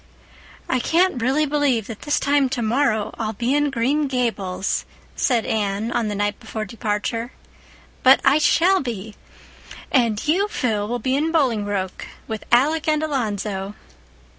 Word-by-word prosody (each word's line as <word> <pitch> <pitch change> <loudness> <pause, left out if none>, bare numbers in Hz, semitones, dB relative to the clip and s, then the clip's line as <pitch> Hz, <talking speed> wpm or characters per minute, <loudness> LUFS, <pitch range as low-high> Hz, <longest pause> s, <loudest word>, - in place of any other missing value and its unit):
"I 255 - +1
can't 335 -1 +2
really 270 +6 +2
believe 285 -6 +1
that 220 -1 -8
this 295 0 0
time 280 -1 +2
tomorrow 235 -3 0
I'll 220 -1 -2
be 240 +5 -1
in 290 0 +2
Green 275 +4 0
Gables," 220 -8 -1 0.3
said 240 -4 +1
Anne 210 +1 -1
on 235 -2 0
the 210 - -3
night 205 0 -1
before 215 -1 -5
departure. 225 +2 -3 0.7
"But 265 +1 +7
I 280 +3 +5
shall 360 +4 +4
be. 220 -5 -5 0.8
And 230 -4 +1
you, 375 +7 +2
Phil, 220 - -1
will 240 +2 -2
be 260 +3 -1
in 310 +3 0
Bolingbroke 205 - -1 0.2
with 220 -2 -5
Alec 290 +7 +3
and 305 0 +2
Alonzo." 210 -8 -2
240 Hz, 145 wpm, -22 LUFS, 215-285 Hz, 0.8 s, But